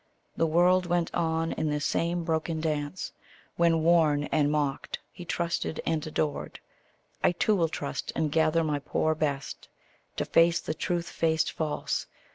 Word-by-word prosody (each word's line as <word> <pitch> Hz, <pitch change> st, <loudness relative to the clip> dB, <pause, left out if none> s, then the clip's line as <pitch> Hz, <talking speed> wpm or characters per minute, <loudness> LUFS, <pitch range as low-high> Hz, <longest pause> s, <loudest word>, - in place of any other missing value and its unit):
The 165 Hz, -, +2 dB
world 180 Hz, +3 st, +4 dB
went 175 Hz, -1 st, 0 dB
on 165 Hz, 0 st, 0 dB
in 155 Hz, -, -1 dB
this 150 Hz, 0 st, -1 dB
same 170 Hz, +2 st, 0 dB
broken 160 Hz, 0 st, -1 dB
dance, 155 Hz, +2 st, -3 dB, 0.4 s
When, 165 Hz, -2 st, +3 dB
worn 160 Hz, -3 st, +4 dB
and 150 Hz, -2 st, +3 dB
mocked, 145 Hz, -2 st, -1 dB
he 175 Hz, -, -10 dB
trusted 170 Hz, -2 st, -2 dB
and 160 Hz, -1 st, -1 dB
adored: 155 Hz, -1 st, -2 dB, 0.6 s
I -, -, +4 dB
too 210 Hz, +4 st, +2 dB
will 165 Hz, -4 st, +2 dB
trust, 145 Hz, -, -4 dB
and 155 Hz, -2 st, 0 dB
gather 160 Hz, +1 st, +3 dB
my 150 Hz, -2 st, 0 dB
poor 155 Hz, +2 st, 0 dB
best 145 Hz, -3 st, -3 dB, 0.5 s
To -, -, -1 dB
face 165 Hz, 0 st, +4 dB
the -, -, -3 dB
truth 170 Hz, +2 st, -2 dB
faced 160 Hz, -1 st, +1 dB
false. 155 Hz, -2 st, -2 dB
160 Hz, 155 wpm, -28 LUFS, 150-170 Hz, 0.6 s, world